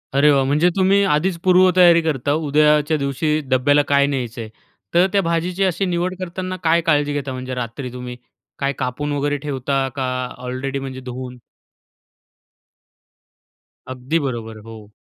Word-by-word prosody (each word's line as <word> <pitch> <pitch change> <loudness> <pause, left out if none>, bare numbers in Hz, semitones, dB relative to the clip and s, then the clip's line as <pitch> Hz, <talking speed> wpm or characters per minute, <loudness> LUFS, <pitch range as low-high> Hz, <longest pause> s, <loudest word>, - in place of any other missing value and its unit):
अरे 145 +2 +5
वाह! 135 -1 +3
म्हणजे 150 +6 +3
तुम्ही 195 +1 +3
आधीच 170 +4 0
पूर्वतयारी 180 -2 +5
करता, 145 -3 -1
उद्याच्या 150 0 +2
दिवशी 150 +2 -1
डब्याला 145 +3 +3
काय 140 0 +3
न्यायचंय. 120 -5 -4 0.5
तर 180 +2 +4
त्या 200 - +3
भाजीची 175 +2 -1
अशी 190 +1 0
निवड 180 +1 -1
करताना 185 0 -5
काय 165 +1 +3
काळजी 145 -3 +1
घेता 140 -2 -3
म्हणजे 130 0 -5
रात्री 125 +1 -5
तुम्ही? 125 -1 -7 0.4
काय 140 0 0
कापून 130 +3 -3
वगैरे 145 0 -1
ठेवता 135 -1 -2
का 135 - -2 0.3
ऑलरेडी 130 +2 -4
म्हणजे 130 -1 -7
धुवून? 125 0 -7 2.6
अगदी 130 +6 -1
बरोबर. 115 -6 -5
हो. 110 -2 -12
145 Hz, 140 wpm, -20 LUFS, 130-170 Hz, 2.6 s, अरे